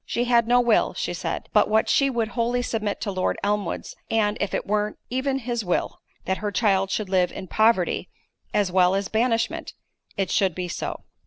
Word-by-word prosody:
She 240 - -1
had 235 -2 +3
no 245 +1 +5
will, 240 -3 +2
she - - -2
said, - - -4
but - - +4
what 220 +1 +3
she 275 -1 +3
would 230 -4 -1
wholly 240 +1 0
submit 215 -4 -2
to 205 - -2
Lord 185 -1 -1
Elmwood's; 205 -2 -2
and, 210 -2 +1
if 200 - -1
it - - -2
were 210 +1 -1
even 265 +1 0
his 240 -3 -3
will, 180 -2 -2 0.2
that 190 - -1
her 210 0 -2
child 195 -2 +2
should 210 +1 -2
live 185 -1 +2
in - - -7
poverty, 215 -2 +2 0.4
as 200 -3 +1
well 185 0 +4
as 195 0 -1
banishment, 230 +1 0 0.4
it 195 -2 -1
should 190 -5 +2
be 180 -1 -3
so. 175 - -5
210 Hz, 195 wpm, -24 LUFS, 195-235 Hz, 0.4 s, no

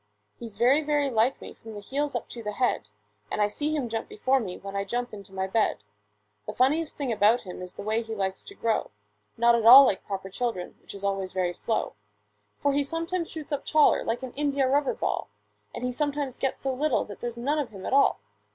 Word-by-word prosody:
He 235 - -6
is 205 -3 -11
very, 265 +6 +4
very 290 -2 +1
like 235 +3 +2
me - - -9
from 220 -1 -11
the - - -6
heels 280 +8 -2
up - - -3
to 235 - -7
the 210 -1 -4
head; 245 - 0 0.4
And - - -3
I 210 - +4
see 295 +8 -2
him 275 -5 -1
jump 225 0 -4
before 260 +5 +1
me, 190 -7 -5
when 195 0 -8
I 200 - 0
jump 240 +4 -3
into 200 -2 -10
my 190 0 -2
bed. 190 - 0 0.6
The - - -4
funniest 300 +5 +1
thing 275 -4 -2
about 220 +2 +4
him 180 -2 -8
is 180 0 -8
the - - -7
way 220 +2 0
he 225 -1 -6
likes 190 -2 -2
to 400 - -11
grow— 230 - 0 0.5
Not 235 +1 +5
at 235 -1 +2
all 260 +5 +11
like 190 - 0
proper 195 -1 -5
children, 225 -5 -3
which - - -11
is 200 - -10
always 195 -1 -1
very 180 -2 0
slow; 220 - -2 0.6
For 285 - +1
he 285 - +2
sometimes 330 +4 -3
shoots 310 -2 -8
up 285 -1 -2
taller 310 -1 +4
like 230 +3 -2
an 255 - -6
india 280 -2 +1
rubber 280 +1 +2
ball, - - -2 0.4
And - - -7
he 250 - 0
sometimes 285 -1 -2
gets 270 - -1
so 270 -1 -1
little 285 +1 +1
that 205 - -10
there's 240 -1 -5
none 285 +6 0
of 280 -5 -2
him 195 -3 -10
at - - -2
all. 275 - +4
240 Hz, 235 wpm, -27 LUFS, 205-280 Hz, 0.6 s, all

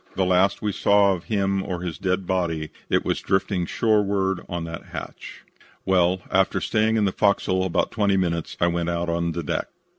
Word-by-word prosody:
The 95 - +1
last 95 +3 +2
we 105 - 0
saw 100 0 +4
of 90 -2 -6
him 100 -2 0
or 90 -3 -4
his 85 -5 -5
dead 95 0 -1
body 85 -4 -1 0.2
it - - +1
was - - 0
drifting 95 -2 0
shoreward 100 -4 +1
on 85 -1 -3
that 80 0 -7
hatch. - - -9 0.4
"Well, 90 -1 +2
after 95 0 +2
staying 110 +1 +1
in 105 - +2
the 95 - +1
fo'c's'l 95 -2 +1
about 95 -3 0
twenty 100 -3 +1
minutes 85 -3 -2
I - - +3
went 85 0 0
out 85 0 -2
on 85 0 0
deck. 80 -3 -3
95 Hz, 185 wpm, -24 LUFS, 85-100 Hz, 0.4 s, saw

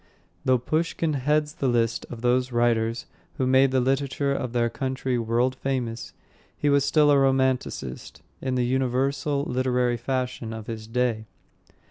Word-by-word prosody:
Though 130 0 +4
Pushkin 155 +4 -1
heads 150 +2 +1
the 135 - -2
list 115 -2 0
of 120 -2 -8
those 125 +1 +2
writers 115 -1 +1 0.3
who 130 - +1
made 130 +1 +5
the 130 0 +2
literature 135 +2 0
of 125 -3 -3
their 120 -1 +1
country 130 0 -2
world 120 +3 +1
famous, 125 -3 -3 0.4
he 145 - +1
was 140 -1 +4
still 145 +1 +4
a 140 - +5
romanticist, 130 - -1 0.2
in 130 -1 -1
the 125 -1 +1
universal 135 +3 0
literary 125 -2 0
fashion 125 -2 -3
of 110 -1 -7
his 110 -1 -6
day. 115 -2 -1
130 Hz, 150 wpm, -25 LUFS, 120-135 Hz, 0.4 s, made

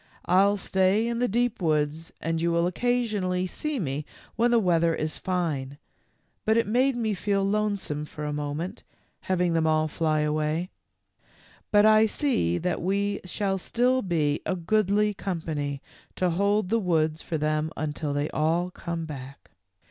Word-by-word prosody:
I'll 200 +3 +4
stay 190 +3 +2
in 235 0 -1
the 245 - +2
deep 240 0 0
woods 155 0 0
and 165 0 -2
you 170 0 +1
will 170 0 +2
occasionally 205 -3 0
see 295 +9 -3
me 145 -4 -2 0.3
when 235 +1 +3
the 240 - +4
weather 170 -5 +3
is 155 0 -3
fine, 155 -7 -2 0.7
but 220 +1 +3
it 230 - +3
made 255 +5 +2
me 225 -3 0
feel 195 +1 0
lonesome 200 -7 -1
for 150 0 -7
a 150 - -2
moment, 150 +4 -4 0.4
having 180 -2 0
them 160 -1 +2
all 155 0 +2
fly 155 0 0
away; 155 +4 -1 1.0
but 205 0 +5
I 215 0 +6
see 210 - +1
that 180 - -2
we 200 +2 0
shall 195 +1 -1
still 250 +6 +1
be 155 -7 0
a 185 - -1
goodly 210 +3 +2
company 155 -7 -3 0.3
to 180 -1 +1
hold 200 +2 +1
the 230 +2 +2
woods 160 -5 +1
for 160 - -3
them 155 +1 0
until 150 -1 -3
they 145 +1 0
all 165 +4 0
come 170 -2 -4
back." 140 -3 -9
180 Hz, 160 wpm, -26 LUFS, 155-210 Hz, 1.0 s, I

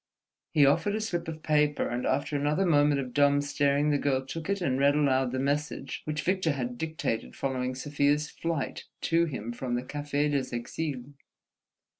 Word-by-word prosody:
He 150 -3 +5
offered 165 +9 +2
a - - -1
slip 175 -7 -3
of 160 -1 -6
paper, 150 -1 +2
and 120 +1 -2
after 145 +1 0
another 150 +6 +1
moment 145 -4 +4
of 130 -2 -5
dumb 145 0 +4
staring, 145 +1 +1
the 145 - +2
girl 135 -2 0
took 165 +5 -6
it 200 0 +1
and 135 -7 0
read 140 +1 +4
aloud 135 -4 +2
the 130 - -2
message 145 +3 -2
which 155 0 -2
Victor 185 -4 +1
had 125 -3 -3
dictated 155 -8 -3
following 130 -1 -2
Sofia's 145 +2 +1
flight 165 -4 -3 0.2
to 165 +1 +2
him 120 -7 -5
from 120 0 -3
the 120 - -2
Café 145 +2 -1
des 135 -4 -1
Exiles. 135 +2 -4
145 Hz, 180 wpm, -28 LUFS, 130-155 Hz, 0.2 s, He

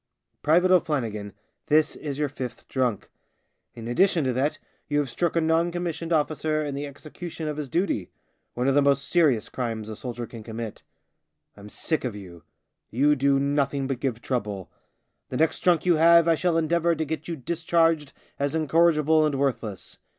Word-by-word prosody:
" - - -52
Private 175 +5 +4
O'Flannigan, 115 - +1 0.4
this 155 0 +3
is 145 -3 -5
your 150 0 0
fifth 130 -3 -7
drunk. 125 -6 -1 0.6
In 115 -1 -8
addition 165 +6 +3
to 130 -1 0
that 135 +5 0 0.3
you 145 - 0
have 145 -4 0
struck 170 +4 -1
a 165 - +3
non 165 +2 +2
commissioned 170 -1 -4
officer 155 0 0
in 145 - -3
the 145 +1 -4
execution 155 +3 -8
of 150 -1 -3
his 150 -3 -4
duty, 170 - -1 0.5
one 125 +2 0
of 135 - +3
the 145 - +4
most 140 -1 +2
serious 150 -11 +3
crimes 115 -4 -4
a 110 - -5
soldier 120 +1 -5
can 115 -1 -10
commit. 110 0 -7 0.7
I'm 105 0 -12
sick 160 +7 -2
of 125 -5 -3
you. 90 -4 -11 0.5
You 145 +6 +3
do 140 0 +2
nothing 140 0 0
but 135 -2 -3
give 120 -4 -3
trouble. 105 -7 -3 0.6
The 125 - -3
next 160 +2 +2
drunk 175 -3 +2
you 175 -3 +4
have 170 +1 +6
I 165 - +5
shall 170 +1 +1
endeavour 170 +1 +2
to 160 0 -2
get 155 +1 -4
you 170 - -3
discharged 165 0 +1 0.3
as 140 +2 0
incorrigible 160 0 +3
and 150 -2 +1
worthless. 125 -7 -3
145 Hz, 180 wpm, -25 LUFS, 125-160 Hz, 0.7 s, have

